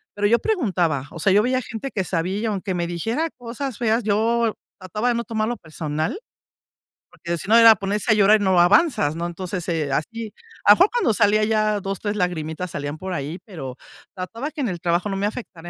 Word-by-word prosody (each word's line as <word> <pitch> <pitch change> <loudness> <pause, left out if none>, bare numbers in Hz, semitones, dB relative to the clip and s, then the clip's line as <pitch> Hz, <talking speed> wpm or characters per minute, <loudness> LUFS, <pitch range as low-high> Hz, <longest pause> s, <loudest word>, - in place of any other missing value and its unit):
pero 205 0 +1
yo 235 +3 +4
preguntaba, 180 - 0
o 165 - -9
sea, 190 +4 +3
yo 210 +2 +5
veía 255 +1 +1
gente 225 +4 -6
que 190 - -1
sabía 180 +4 -1
y, 225 - -2
aunque 200 -3 -2
me 170 -1 -1
dijera 225 - -2
cosas 245 +1 -5
feas, 230 0 +1
yo 225 +2 +1 0.3
trataba 210 +6 -2
de 240 - +1
no 235 - -1
tomarlo 225 +1 -2
personal, 155 - -4 0.9
porque 170 -1 -4
si 180 - -6
no, 225 - +7
era 230 -1 +9
ponerse 205 +3 -1
a 215 - +5
llorar 210 +1 +5
y - - 0
no 190 -2 +3
avanzas, 175 - +3
¿no? 170 - -3
Entonces, 180 0 -5
eh, 160 -4 -1
así, 220 +8 -3 0.3
a 205 - +9
poco 425 - +3
no, - - +3
salían 210 0 +3
ya 215 -1 +1
2, 195 -1 -4
3 205 0 -2
lagrimitas, 175 -1 -2
salían 145 +1 -4
por 185 +3 -5
ahí, 155 +2 -4
pero 135 - -8 0.4
trataba 230 +11 -5
que 310 - -11
en 255 - 0
el 175 -2 -4
trabajo 175 +3 0
no 195 - -2
me 200 - -1
afectara 185 -7 -8
205 Hz, 215 wpm, -22 LUFS, 175-225 Hz, 0.9 s, era